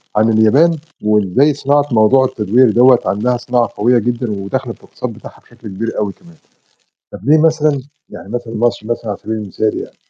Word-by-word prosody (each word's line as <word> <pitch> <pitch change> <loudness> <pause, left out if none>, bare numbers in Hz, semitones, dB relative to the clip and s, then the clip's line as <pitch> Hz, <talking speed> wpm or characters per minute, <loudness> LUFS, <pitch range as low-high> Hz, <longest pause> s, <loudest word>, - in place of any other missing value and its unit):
عن 110 +2 +3
اليابان 135 +10 +3 0.3
وإزاي 105 +7 +2
صناعة 145 +1 +1
موضوع 115 +4 +4
التدوير 120 0 +2
دَوَّة 125 +2 +5
عندها 120 +4 0
صناعة 120 -1 0
قوية 120 +4 +3
جدًا 120 0 -2
وداخلة 100 -1 -4
في - - -23
الاقتصاد - - -7
بتاعها - - -13
بشكل 115 - -15
كبير 110 +4 -5
أوي 100 -2 -2
كمان، 170 -2 -20 0.8
طَب - - -8
ليه 150 +3 +4
مثلًا 155 -3 +2 0.3
يعني 100 - -11
مثلًا 120 -1 -5
مصر 115 -1 -1
مثلًا 120 -1 -4
على 100 - -3
سَبيل 110 - -5
المثال 105 +1 -3
يعني - - -8
120 Hz, 180 wpm, -15 LUFS, 105-130 Hz, 0.8 s, دَوَّة